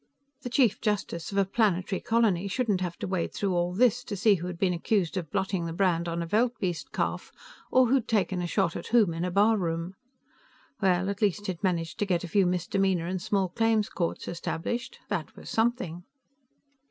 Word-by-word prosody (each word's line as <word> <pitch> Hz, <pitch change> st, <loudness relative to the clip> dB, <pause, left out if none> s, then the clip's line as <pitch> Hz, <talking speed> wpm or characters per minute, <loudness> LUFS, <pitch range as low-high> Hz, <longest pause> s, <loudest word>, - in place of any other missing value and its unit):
The 245 Hz, -, -5 dB
Chief 240 Hz, -4 st, +2 dB
Justice 205 Hz, -6 st, -2 dB
of 200 Hz, -, -3 dB
a 195 Hz, -, +4 dB
planetary 195 Hz, -2 st, +1 dB
colony 215 Hz, -5 st, +2 dB
shouldn't 205 Hz, -3 st, 0 dB
have 175 Hz, -2 st, -3 dB
to -, -, -4 dB
wade 185 Hz, -2 st, -2 dB
through 195 Hz, -2 st, 0 dB
all 175 Hz, 0 st, +1 dB
this 245 Hz, +4 st, +3 dB
to 205 Hz, -, -4 dB
see 210 Hz, +2 st, +5 dB
who 175 Hz, -2 st, -2 dB
had 180 Hz, -1 st, -5 dB
been 180 Hz, 0 st, +1 dB
accused 175 Hz, 0 st, 0 dB
of 175 Hz, -5 st, -3 dB
blotting 190 Hz, -2 st, -1 dB
the 165 Hz, -, -4 dB
brand 170 Hz, -2 st, +1 dB
on 170 Hz, 0 st, -2 dB
a -, -, -4 dB
veldbeest 210 Hz, -3 st, -1 dB
calf -, -, -2 dB, 0.4 s
or 255 Hz, 0 st, +6 dB
who'd 250 Hz, -1 st, +2 dB
taken 190 Hz, -4 st, +1 dB
a 175 Hz, -, -2 dB
shot 180 Hz, -1 st, 0 dB
at -, -, -5 dB
whom 220 Hz, -8 st, +4 dB
in 165 Hz, +1 st, -3 dB
a 180 Hz, -, 0 dB
barroom. 180 Hz, -4 st, +1 dB, 0.9 s
Well, 185 Hz, -1 st, +2 dB
at 200 Hz, +1 st, -3 dB
least 205 Hz, 0 st, +1 dB
he'd 180 Hz, -4 st, -4 dB
managed 170 Hz, -4 st, -1 dB
to 205 Hz, -, 0 dB
get 175 Hz, -3 st, +1 dB
a -, -, -4 dB
few 190 Hz, +2 st, +3 dB
misdemeanor 180 Hz, 0 st, 0 dB
and 185 Hz, +1 st, -3 dB
small 195 Hz, 0 st, 0 dB
claims 225 Hz, +1 st, +1 dB
courts 170 Hz, -2 st, -3 dB
established; 235 Hz, +9 st, -4 dB
that -, -, -3 dB
was -, -, -10 dB
something. 225 Hz, -7 st, 0 dB
190 Hz, 200 wpm, -28 LUFS, 175-215 Hz, 0.9 s, or